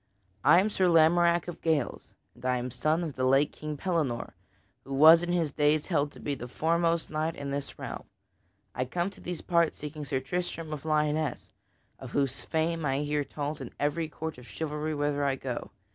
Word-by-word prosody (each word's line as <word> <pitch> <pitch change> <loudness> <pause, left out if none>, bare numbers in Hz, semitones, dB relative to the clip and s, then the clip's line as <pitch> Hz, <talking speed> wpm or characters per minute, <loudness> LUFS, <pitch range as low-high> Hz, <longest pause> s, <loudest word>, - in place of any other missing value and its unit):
I 175 - +7
am 210 +3 +1
Sir 190 -2 +2
Lamorack 170 +1 +4
of 175 - -7
Gales, 155 -6 -1 0.2
and - - -19
I 125 0 +1
am 125 +1 -4
son 155 +8 +1
of 160 -4 -4
the 130 - -3
late 135 +3 +4
King 150 -1 -6
Pellinore, 150 -9 -1 0.5
who 135 - -5
was 160 +4 +9
in 175 0 -2
his 170 -4 +1
days 150 +1 +2
held 145 -5 0
to - - -13
be 145 - -2
the 125 -3 -6
foremost 165 +4 0
knight 155 +1 -1
in 140 -1 -5
this 140 0 -4
realm. - - -6 0.7
I 130 - -1
come 175 +8 -2
to - - -15
these 175 -2 -5
parts 170 -2 +2
seeking 150 0 -6
Sir 135 -2 -1
Tristram 165 +2 -3
of 150 0 -7
Lyonesse, 150 -9 0 0.5
of 130 -2 -9
whose 135 -2 0
fame 165 0 -1
I 135 -1 0
hear 150 0 0
told 145 +1 -5
in 125 - -8
every 155 +2 0
court 160 -5 -6
of 125 - -14
chivalry 155 0 -3
whither 145 0 0
I 140 -1 +2
go. 130 -2 -5
150 Hz, 200 wpm, -29 LUFS, 140-165 Hz, 0.7 s, was